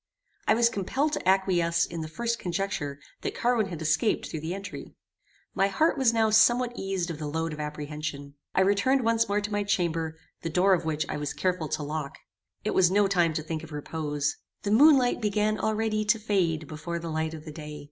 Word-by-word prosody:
I - - +5
was 235 +1 +4
compelled 260 +9 -1
to 185 - 0
acquiesce 180 -3 +2
in 170 -1 -6
the 155 - -4
first 235 +7 -2
conjecture 175 -6 -3 0.2
that - - -3
Carwin 235 -4 +1
had 170 -4 -6
escaped 155 +8 +1
through 160 - -5
the 160 +4 -4
entry. 200 0 -8 0.6
My 195 - +2
heart 310 +12 +2
was 265 -5 +3
now 225 -1 +2
somewhat 240 +3 +4
eased 190 -4 -2
of 160 - -7
the 150 - -4
load 160 +2 -2
of 150 - -8
apprehension. 150 -1 -5 0.2
I - - +4
returned 205 +7 +3
once 230 -1 +2
more 205 +1 +1
to 205 +1 -4
my 205 0 0
chamber, 165 -5 -1 0.2
the 165 - -3
door 185 +4 +4
of 175 - 0
which 155 -1 -1
I - - -3
was 145 0 -3
careful 180 -4 -1
to 150 - -2
lock. 150 -1 -4 0.5
It - - -1
was 180 -2 +5
no 200 +2 +3
time 175 -5 +2
to 155 - -2
think 160 0 -4
of 160 - -10
repose. 145 -1 -2 0.3
The 205 - -1
moon 285 +6 +7
light 245 -2 +1
began 210 0 +1
already 215 +1 0
to 210 +2 +3
fade 175 -8 0
before 155 +3 -5
the 165 -1 -5
light 160 0 -2
of 155 0 -10
the 155 - -7
day. 150 -1 -8
180 Hz, 215 wpm, -27 LUFS, 155-215 Hz, 0.6 s, moon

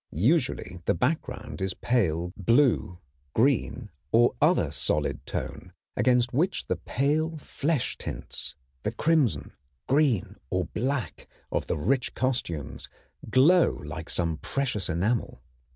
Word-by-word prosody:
Usually 130 - -2
the - - +2
background 125 - -2
is 95 -1 -1
pale 90 -8 0
blue, 115 - +3 0.4
green, 125 -2 +1 0.2
or 120 +1 +5
other - - +3
solid 75 -1 0
tone, 90 +1 -5 0.2
against 125 -1 +3
which 165 +9 +1
the - - 0
pale 155 +4 0
flesh 150 -1 -2
tints, 70 +5 -5 0.3
with - - -3
crimson, 135 - +2 0.4
green, 135 - +2
or - - 0
black 130 - -3 0.2
of - - -1
the - - -1
rich 125 - 0
costumes, 120 - -2 0.4
glow 160 +10 +6
like 75 +2 -7
some 85 -3 0
precious 125 - -1
enamel. 90 - -1
120 Hz, 120 wpm, -27 LUFS, 90-140 Hz, 0.4 s, glow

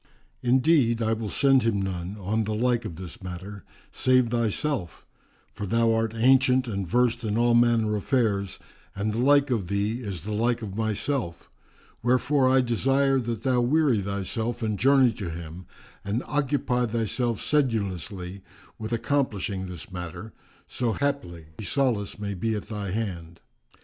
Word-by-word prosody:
Indeed, 125 -2 +3
I 110 0 +1
will 110 -1 -3
send 135 +1 +4
him 115 -3 +1
none, 95 0 -4
on 105 +4 -1
the 110 +1 -2
like 120 +1 +1
of 85 - -5
this 90 +2 -9
matter, 95 +2 -7 0.3
save 130 -2 +3
thyself; 115 - -1 0.5
for 100 - -5
thou 115 +2 +3
art 115 -1 0
ancient 130 +2 +4
and 100 -4 -3
versed 120 +2 +1
in 105 -1 -1
all 120 0 +3
manner 115 -2 +3
affairs 105 -4 0 0.4
and 105 +2 -1
the 115 - -2
like 140 +2 +4
of 105 -7 0
thee 105 +5 -1
is 95 -8 -5
the 105 +2 -4
like 115 +2 0
of 100 -3 -6
myself; 110 -3 -2 0.5
wherefore 130 +3 +3
I 130 0 +5
desire 135 +3 +2
that 115 -3 -4
thou 130 -2 +2
weary 130 -3 +3
thyself 105 +5 -3
and 105 -2 -1
journey 135 -2 +5
to 100 -5 -6
him 85 +2 -8 0.4
and 105 +5 -2
occupy 140 -4 0
thyself 115 +1 -1
sedulously 100 - -1 0.4
with 110 +1 -5
accomplishing 115 -6 -1
this 90 -1 -9
matter, 90 +4 -7 0.3
so 120 -3 -1
haply 95 - -2 0.2
solace 115 -2 0
may 100 -1 -4
be 110 +4 -1
at 105 0 -6
thy 105 -3 -4
hand." 90 -5 -4
115 Hz, 155 wpm, -26 LUFS, 100-125 Hz, 0.5 s, I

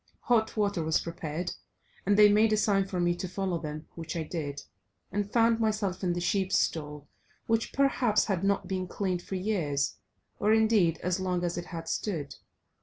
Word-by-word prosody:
Hot 220 -2 +1
water 200 -4 +1
was 160 0 +2
prepared, 165 +1 -4 0.6
and 200 0 +4
they 210 0 +9
made 215 +2 +4
a 215 - +3
sign 200 -2 +2
for 185 -2 -3
me 175 0 +2
to 175 +2 -5
follow 185 -1 -2
them, 155 -1 -6
which 165 +1 -6
I 165 - -1
did, 150 -3 -5 0.5
and 205 0 -2
found 230 -1 +3
myself 210 -4 -1
in 175 -1 +1
the 175 - -2
sheep 190 +2 0
stall, 150 -4 -1 0.4
which, 225 0 0
perhaps, 250 -6 +2
had 195 -3 -1
not 200 0 +1
been 185 -1 -2
cleaned 185 -1 -2
for 190 - -6
years, 170 -8 -1 0.4
or 210 +1 +3
indeed 215 -7 +3
as 180 +1 0
long 180 -1 -1
as 175 -1 -1
it 175 - -4
had 165 -2 -7
stood. 155 -10 -2
185 Hz, 185 wpm, -29 LUFS, 170-210 Hz, 0.6 s, they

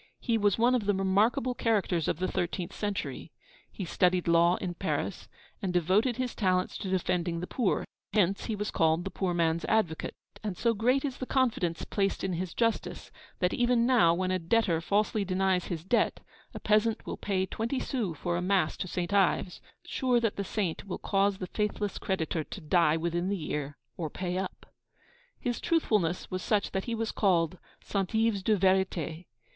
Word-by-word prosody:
He 235 - 0
was 205 -3 +2
one 240 +2 +4
of 240 -5 +1
the 205 - +3
remarkable 205 +6 +2
characters 200 -9 +1
of - - 0
the 185 +2 -1
thirteenth 175 0 -2
century. 205 -2 -4 0.4
He 195 - -5
studied 180 0 +2
law 170 +1 +5
in 180 -2 -4
Paris, - - -3 0.3
and 190 -3 -1
devoted 190 +8 +2
his 255 -1 -2
talents 185 -3 +1
to 195 - -4
defending 180 -2 0
the 175 - -3
poor; 225 +1 0 0.3
hence, 200 -2 +2
he 220 - -2
was 210 +1 -3
called 160 +1 +2
'the 195 - -4
poor 180 -3 -1
man's 165 -1 +1
advocate:' 210 -8 0 0.3
and 200 -5 -3
so 235 -1 +2
great 250 +6 +2
is 270 -3 -3
the 255 - -4
confidence 225 -11 0
placed 195 -1 -1
in 190 -1 -1
his 175 0 -4
justice, 230 -1 -1 0.3
that, 180 0 +1
even 240 -1 +3
now, 240 -10 +5
when 185 +1 -1
a 185 - +1
debtor 170 -2 +1
falsely 210 +3 +1
denies 190 -1 +1
his 165 -3 -4
debt, 235 +6 +1 0.4
a - - -4
peasant 215 +1 +2
will - - -4
pay 190 -2 -1
twenty 230 +7 -2
sous 210 - -2
for 175 +2 -1
a - - -1
mass 185 -3 +1
to - - -3
St. 180 +2 -3
Ives, 190 -2 +2 0.2
sure 255 -3 +1
that 225 -3 0
the 200 - -2
Saint 190 -4 -2
will 185 - -3
cause 200 0 +1
the 185 - -4
faithless 210 0 -2
creditor 165 -4 -1
to 195 - -8
die 165 -1 +3
within 170 +2 -1
the 200 - 0
year 150 -3 -4 0.2
or 160 -3 -3
pay 180 +3 -3
up. 190 - -5 0.7
His 245 -3 -2
truthfulness 210 - +1
was 185 0 -2
such 205 0 0
that 190 - -2
he 235 - -2
was 225 0 -2
called 175 -4 +1 0.2
'St. 195 0 -2
Yves 220 -3 +2
de 210 +2 +2
vérité.' 185 -3 +1
190 Hz, 190 wpm, -29 LUFS, 175-220 Hz, 0.7 s, law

